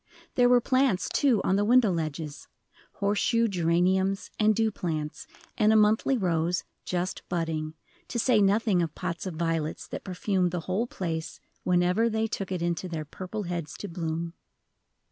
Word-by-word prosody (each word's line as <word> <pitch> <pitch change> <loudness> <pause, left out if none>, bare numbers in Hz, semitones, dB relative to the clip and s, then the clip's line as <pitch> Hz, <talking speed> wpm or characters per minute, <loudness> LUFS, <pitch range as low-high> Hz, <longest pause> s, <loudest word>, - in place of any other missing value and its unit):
There 245 -1 +4
were 245 0 +6
plants, 255 -5 +2
too, 250 -9 +3
on 190 - +2
the 205 - +2
window 235 -1 +5
ledges, 155 -3 -4 0.5
horse 205 0 0
shoe 230 -1 +2
geraniums, 190 +1 +1
and 215 0 +4
dew 225 0 +2
plants, 155 -6 -4 0.3
and 215 0 +5
a - - +4
monthly 215 +5 +4
rose, 175 -3 0 0.2
just 180 +1 -2
budding, 160 -3 -2 0.3
to - - -4
say 235 -2 +3
nothing 200 -1 +3
of 165 -2 -3
pots 175 0 -4
of 180 - -5
violets 165 -1 -2
that - - -6
perfumed 185 -1 0
the 175 -1 -3
whole 190 +8 -1
place 165 -7 -4 0.2
whenever 180 +5 +2
they 220 0 0
took 195 -3 -4
it 180 -2 -2
into 175 +1 -2
their 160 -2 -4
purple 185 +7 -6
heads 170 -4 -4
to 205 - -6
bloom. 165 -1 -3
185 Hz, 165 wpm, -27 LUFS, 170-215 Hz, 0.5 s, were